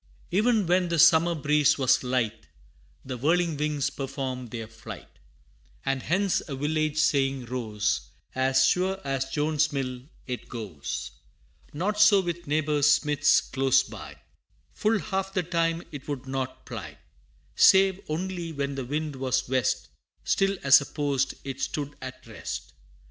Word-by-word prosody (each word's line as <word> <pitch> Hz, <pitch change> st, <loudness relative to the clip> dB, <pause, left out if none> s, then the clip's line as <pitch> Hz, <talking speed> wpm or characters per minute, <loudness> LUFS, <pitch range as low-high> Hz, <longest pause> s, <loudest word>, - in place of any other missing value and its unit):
E'en 215 Hz, +1 st, +3 dB
when 180 Hz, +1 st, +2 dB
the 170 Hz, -, 0 dB
summer 165 Hz, +2 st, +6 dB
breeze 150 Hz, -1 st, +3 dB
was 130 Hz, -1 st, +3 dB
light, 125 Hz, -3 st, -1 dB, 0.6 s
The 130 Hz, -1 st, -5 dB
whirling 165 Hz, +4 st, +2 dB
wings 145 Hz, -1 st, -1 dB
performed 130 Hz, -3 st, -5 dB
their 115 Hz, 0 st, -5 dB
flight; 115 Hz, -, -11 dB, 0.7 s
And 135 Hz, -1 st, 0 dB
hence 190 Hz, +5 st, +1 dB
a 140 Hz, -, -3 dB
village 155 Hz, +2 st, -1 dB
saying 135 Hz, -4 st, +2 dB
rose 105 Hz, -, -2 dB, 0.2 s
"As 130 Hz, 0 st, +3 dB
sure 185 Hz, +7 st, +1 dB
as 135 Hz, -1 st, -1 dB
Jones's 150 Hz, +1 st, +1 dB
mill, 130 Hz, -3 st, -3 dB, 0.2 s
it 125 Hz, -1 st, -6 dB
goes." 100 Hz, -, -5 dB, 0.6 s
Not 205 Hz, +7 st, -1 dB
so 210 Hz, -1 st, +7 dB
with 175 Hz, -3 st, -4 dB
neighbor 150 Hz, 0 st, +1 dB
Smith's 145 Hz, 0 st, +4 dB
close 135 Hz, -1 st, +2 dB
by; -, -, -10 dB, 0.6 s
Full 220 Hz, +1 st, +1 dB
half 195 Hz, -2 st, -3 dB
the 185 Hz, -, +1 dB
time 165 Hz, 0 st, 0 dB
it 145 Hz, -3 st, -9 dB
would 140 Hz, -3 st, -4 dB
not 130 Hz, -1 st, -4 dB
ply: 95 Hz, -, -8 dB, 0.6 s
Save 190 Hz, -1 st, +6 dB
only 175 Hz, +1 st, -3 dB
when 140 Hz, -2 st, -3 dB
the 135 Hz, -2 st, -4 dB
wind 150 Hz, +1 st, -3 dB
was 130 Hz, -1 st, 0 dB
west, 130 Hz, -3 st, 0 dB, 0.3 s
Still 195 Hz, 0 st, +1 dB
as 140 Hz, +1 st, +7 dB
a -, -, -5 dB
post 140 Hz, -3 st, -1 dB
it 135 Hz, -1 st, -6 dB
stood 145 Hz, -1 st, -3 dB
at 130 Hz, 0 st, -8 dB
rest. -, -, -7 dB
145 Hz, 145 wpm, -27 LUFS, 130-165 Hz, 0.7 s, so